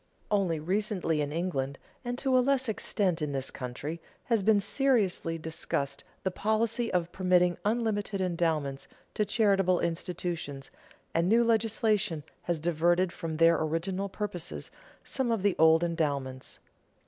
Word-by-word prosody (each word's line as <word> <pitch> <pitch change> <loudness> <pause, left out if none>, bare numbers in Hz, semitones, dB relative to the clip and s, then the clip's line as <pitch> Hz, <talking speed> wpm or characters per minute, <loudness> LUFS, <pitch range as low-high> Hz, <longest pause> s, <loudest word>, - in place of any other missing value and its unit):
Only 190 -6 +2
recently 185 -2 0
in 145 0 -2
England, 140 -5 -2 0.3
and 245 0 -3
to 265 -1 +1
a 255 - +6
less 265 0 +2
extent 195 -5 0
in 150 -2 -2
this 135 -1 -2
country, 140 +6 -5 0.2
has 230 -3 +1
been 210 +1 +4
seriously 200 -8 +1
discussed 155 -4 -3 0.2
the 190 - 0
policy 220 +4 0
of 175 -1 0
permitting 180 -1 +3
unlimited 210 -2 0
endowments 160 -7 -1 0.3
to 210 - +1
charitable 195 -4 +3
institutions, 165 -5 -3 0.4
and 170 +2 +2
new 230 +2 +5
legislation 215 -6 +1 0.3
has 170 -2 +1
diverted 175 +3 +2
from 165 -3 -4
their 165 +1 +4
original 185 +5 -1
purposes 190 -4 -5 0.3
some 260 -3 -1
of 225 -4 0
the 200 -3 +3
old 160 +1 +6
endowments. 140 -6 -2
180 Hz, 135 wpm, -29 LUFS, 160-210 Hz, 0.4 s, a